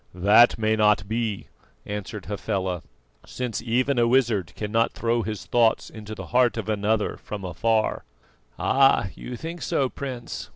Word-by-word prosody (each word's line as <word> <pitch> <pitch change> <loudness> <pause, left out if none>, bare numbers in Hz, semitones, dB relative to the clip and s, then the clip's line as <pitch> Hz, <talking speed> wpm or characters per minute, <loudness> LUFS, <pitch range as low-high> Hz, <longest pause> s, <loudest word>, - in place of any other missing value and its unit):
"That 105 +6 +5
may 110 0 +1
not 105 -2 +3
be," 110 -2 -2 0.4
answered 105 0 -6
Hafela, 95 -3 -2 0.4
"since 125 -4 -4
even 125 +3 +1
a 120 - +4
wizard 115 -8 +2
cannot 115 +2 0
throw 115 0 0
his 105 -4 -5
thoughts 115 -2 +2
into 110 -1 -8
the - - -7
heart 125 -1 +3
of 110 -2 -4
another 105 0 0
from 100 -3 -7
afar." 110 +5 0 0.5
"Ah! 135 -7 +3
you 125 - -8
think 165 +3 -7
so, 135 -2 0
Prince. 125 -4 -6
110 Hz, 150 wpm, -25 LUFS, 105-120 Hz, 0.5 s, That